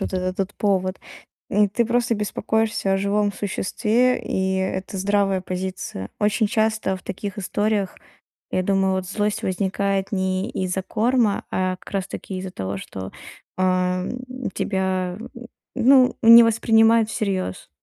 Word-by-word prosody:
вот 195 Hz, -, -3 dB
этот 185 Hz, 0 st, -2 dB
вот 195 Hz, +1 st, -2 dB
повод. 185 Hz, -2 st, 0 dB, 0.5 s
Э, 210 Hz, +1 st, +4 dB
ты 235 Hz, +4 st, +1 dB
просто 240 Hz, 0 st, +1 dB
беспокоишься 220 Hz, 0 st, -1 dB
о -, -, +3 dB
живом 200 Hz, +1 st, +1 dB
существе, 225 Hz, +5 st, 0 dB
и 190 Hz, 0 st, -1 dB
это 190 Hz, +1 st, -3 dB
здравая 195 Hz, 0 st, +1 dB
позиция. 185 Hz, -, -5 dB
Очень 210 Hz, +2 st, +2 dB
часто 220 Hz, -2 st, 0 dB
в 185 Hz, -, -14 dB
таких 200 Hz, +2 st, -6 dB
историях, 205 Hz, 0 st, -1 dB, 0.6 s
я 185 Hz, -, +1 dB
думаю, 195 Hz, 0 st, +2 dB
вот 185 Hz, -1 st, -2 dB
злость 210 Hz, +1 st, -1 dB
возникает 195 Hz, +1 st, -1 dB
не 185 Hz, -1 st, -1 dB
из-за 185 Hz, 0 st, -2 dB
корма, 230 Hz, +1 st, +1 dB
а 185 Hz, 0 st, 0 dB
как -, -, -15 dB
раз 195 Hz, -2 st, -1 dB
таки 190 Hz, -, -6 dB
из-за 185 Hz, 0 st, -6 dB
того, 95 Hz, -, -4 dB
что, 95 Hz, 0 st, -7 dB, 0.5 s
э, 185 Hz, -, +1 dB
м, 185 Hz, +8 st, -1 dB
тебя, 190 Hz, -1 st, -1 dB, 0.6 s
ну, 255 Hz, 0 st, +5 dB
не 230 Hz, 0 st, +10 dB
воспринимают 225 Hz, 0 st, +4 dB
всерьёз. 190 Hz, -, -3 dB
195 Hz, 140 wpm, -22 LUFS, 185-220 Hz, 0.6 s, не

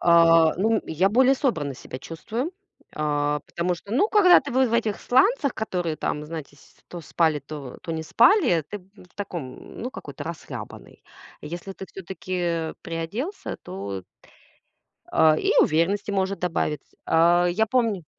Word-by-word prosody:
а, 165 Hz, -1 st, +6 dB
ну, 220 Hz, +3 st, +2 dB
я 170 Hz, +5 st, +2 dB
более 260 Hz, +5 st, +4 dB
собранно 155 Hz, -, -1 dB
себя 130 Hz, -, -9 dB
чувствую. 225 Hz, -, -5 dB, 0.4 s
А, 150 Hz, -1 st, 0 dB
потому 175 Hz, +1 st, -1 dB
что, 200 Hz, +4 st, -13 dB
ну, 350 Hz, -, +3 dB
когда 365 Hz, -5 st, +7 dB
ты -, -, -7 dB
в 260 Hz, +1 st, +3 dB
в -, -, -5 dB
этих 225 Hz, -3 st, 0 dB
сланцах, 280 Hz, -, +3 dB
которые 175 Hz, -7 st, -2 dB
там, 150 Hz, 0 st, -3 dB
знаете, 155 Hz, -3 st, -8 dB
с -, -, -22 dB
то 175 Hz, -, -7 dB
спали, 160 Hz, -1 st, +1 dB
то 140 Hz, -2 st, -9 dB
то 165 Hz, -, -6 dB
не 160 Hz, -, -3 dB
спали, 235 Hz, -, +4 dB
ты 205 Hz, -, -5 dB
в 185 Hz, -1 st, -20 dB
таком 170 Hz, -10 st, -7 dB
ну, 250 Hz, +3 st, -4 dB
какой-то 145 Hz, -, -8 dB
расхлябанный. 170 Hz, 0 st, -8 dB, 0.4 s
Если 175 Hz, +4 st, -7 dB
ты 190 Hz, -, -9 dB
всё-таки 175 Hz, -3 st, -3 dB
приоделся, 175 Hz, -, -4 dB
то 95 Hz, 0 st, -6 dB, 1.1 s
а, 155 Hz, -1 st, +5 dB
и -, -, +1 dB
уверенности 170 Hz, +7 st, +1 dB
может 195 Hz, 0 st, -1 dB
добавиться. 160 Hz, -4 st, -2 dB
А, 170 Hz, +2 st, +4 dB
я 220 Hz, +5 st, +1 dB
помню 220 Hz, -7 st, 0 dB
175 Hz, 150 wpm, -24 LUFS, 160-220 Hz, 1.1 s, когда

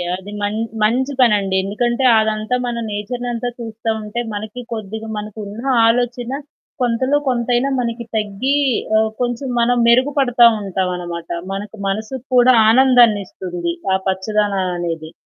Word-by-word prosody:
అది 190 Hz, +2 st, -9 dB
మన్ 205 Hz, +1 st, -1 dB, 0.3 s
మంచి 255 Hz, +6 st, +1 dB
పనండి. 205 Hz, -5 st, +3 dB
ఎందుకంటే 240 Hz, +6 st, -1 dB, 0.2 s
అదంతా 215 Hz, +2 st, 0 dB
మన 240 Hz, -1 st, -3 dB
నేచర్‌నంతా 240 Hz, +3 st, -3 dB
చూస్తా 225 Hz, -1 st, -5 dB
ఉంటే 210 Hz, +3 st, -4 dB
మనకి 215 Hz, +4 st, -6 dB
కొద్దిగ, 220 Hz, 0 st, -6 dB
మనకున్న 210 Hz, +1 st, -7 dB, 0.3 s
ఆలోచన 245 Hz, +1 st, 0 dB, 0.5 s
కొంతలో, 255 Hz, +4 st, +1 dB
కొంతైనా 245 Hz, +2 st, +1 dB
మనకి 235 Hz, 0 st, -3 dB
తగ్గి 215 Hz, +6 st, -1 dB, 0.4 s
ఆహ్, 220 Hz, 0 st, +2 dB
కొంచెం 245 Hz, +2 st, -2 dB
మనం 245 Hz, +1 st, +2 dB
మెరుగుపడతా 250 Hz, 0 st, +4 dB, 0.2 s
ఉంటాం 190 Hz, -1 st, -2 dB
అనమాట. 175 Hz, -1 st, -6 dB, 0.3 s
మనకు 205 Hz, +2 st, -6 dB
మనసుకు 220 Hz, +6 st, -4 dB
కూడా 250 Hz, +1 st, +6 dB, 0.2 s
ఆనందాన్నిస్తుంది. 205 Hz, -8 st, +3 dB, 0.2 s
ఆ -, -, +4 dB
పచ్చదనం 195 Hz, 0 st, 0 dB
అనేది. 165 Hz, -2 st, -4 dB
220 Hz, 120 wpm, -19 LUFS, 205-245 Hz, 0.5 s, కూడా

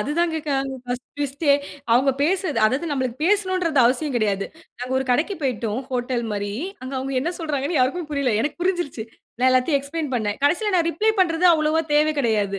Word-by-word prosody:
அதுதான் 325 Hz, +8 st, 0 dB
கேக்கறாங்க 275 Hz, -3 st, -2 dB
ஃபர்ஸ்ட் 245 Hz, 0 st, -4 dB
ஃபர்ஸ்டே, 285 Hz, +1 st, +1 dB, 0.4 s
அவுங்க 265 Hz, +3 st, +4 dB
பேசுறது 335 Hz, -5 st, 0 dB
அதாவது 270 Hz, +9 st, -1 dB
நம்மளுக்கு 260 Hz, -4 st, -2 dB
பேசணும்ன்றது 370 Hz, -6 st, +1 dB
அவசியம் 265 Hz, +3 st, +1 dB
கெடையாது. 200 Hz, -3 st, 0 dB, 0.3 s
நாங்க 250 Hz, +1 st, -5 dB
ஒரு 265 Hz, -, -2 dB
கடைக்கு 310 Hz, +11 st, +1 dB
போயிட்டோம் 240 Hz, -3 st, -1 dB
ஹோட்டல் 245 Hz, -1 st, -1 dB
மாரி. 205 Hz, 0 st, -3 dB, 0.3 s
அங்க 260 Hz, -, -6 dB
அவுங்க 270 Hz, +1 st, -4 dB
என்ன 335 Hz, +6 st, -1 dB
சொல்றாங்கண்ணு 305 Hz, -1 st, -1 dB
யாருக்கும் 300 Hz, +5 st, 0 dB
புரியல்ல. 280 Hz, -5 st, 0 dB
எனக்கு 295 Hz, +7 st, -2 dB
புரிஞ்சிருச்சி. 350 Hz, -10 st, -1 dB, 0.4 s
நான் 255 Hz, +1 st, +4 dB
எல்லாத்தையும் 255 Hz, +3 st, +3 dB
எக்ஸ்ப்ளைன் 295 Hz, +1 st, -4 dB
பண்ணேன். 210 Hz, -3 st, -1 dB
கடைசில 385 Hz, +8 st, +2 dB
நான் 335 Hz, -2 st, +2 dB
ரிப்ளை 430 Hz, +7 st, +1 dB
பண்றது 345 Hz, 0 st, +3 dB
அவ்ளவா 310 Hz, +1 st, +1 dB
தேவை 305 Hz, +1 st, +4 dB
கெடையாது 205 Hz, -5 st, 0 dB
280 Hz, 170 wpm, -22 LUFS, 250-330 Hz, 0.4 s, அவுங்க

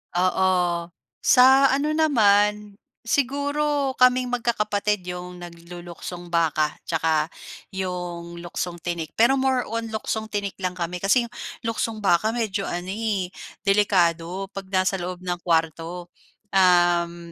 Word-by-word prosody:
Oo. 180 Hz, -1 st, +1 dB, 0.3 s
Sa 265 Hz, +2 st, +6 dB
ano 295 Hz, +3 st, 0 dB
naman, 210 Hz, -8 st, +3 dB, 0.2 s
siguro 285 Hz, +2 st, 0 dB
kaming 255 Hz, 0 st, +4 dB
magkakapatid 210 Hz, -5 st, -1 dB
'yong 180 Hz, 0 st, -6 dB
nagluluksong 175 Hz, 0 st, -9 dB
baka, 160 Hz, -3 st, +1 dB
'tsaka 160 Hz, -1 st, 0 dB, 0.4 s
'yong 175 Hz, -2 st, -5 dB
luksong 175 Hz, 0 st, -4 dB
tinik. 170 Hz, -3 st, -4 dB
Pero 265 Hz, +4 st, +4 dB
more 260 Hz, -1 st, +1 dB
on 230 Hz, 0 st, -2 dB
luksong 220 Hz, 0 st, -3 dB
tinik 205 Hz, -2 st, -4 dB
lang 185 Hz, -1 st, -2 dB
kami, 175 Hz, 0 st, -4 dB
kasi 200 Hz, +7 st, +3 dB
'yong 235 Hz, 0 st, -10 dB, 0.3 s
luksong 225 Hz, -1 st, -2 dB
baka 200 Hz, +4 st, +2 dB
medyo 210 Hz, -4 st, -2 dB
ano 175 Hz, +2 st, -4 dB
eh, 200 Hz, -4 st, -2 dB, 0.3 s
delikado 190 Hz, -2 st, +1 dB
'pag 195 Hz, -1 st, -7 dB
nasa 190 Hz, 0 st, +1 dB
loob 180 Hz, +1 st, -6 dB
ng 175 Hz, -1 st, -2 dB
kuwarto. 170 Hz, +1 st, -1 dB, 0.4 s
Uhm, 175 Hz, -2 st, +3 dB
190 Hz, 120 wpm, -24 LUFS, 175-225 Hz, 0.4 s, Sa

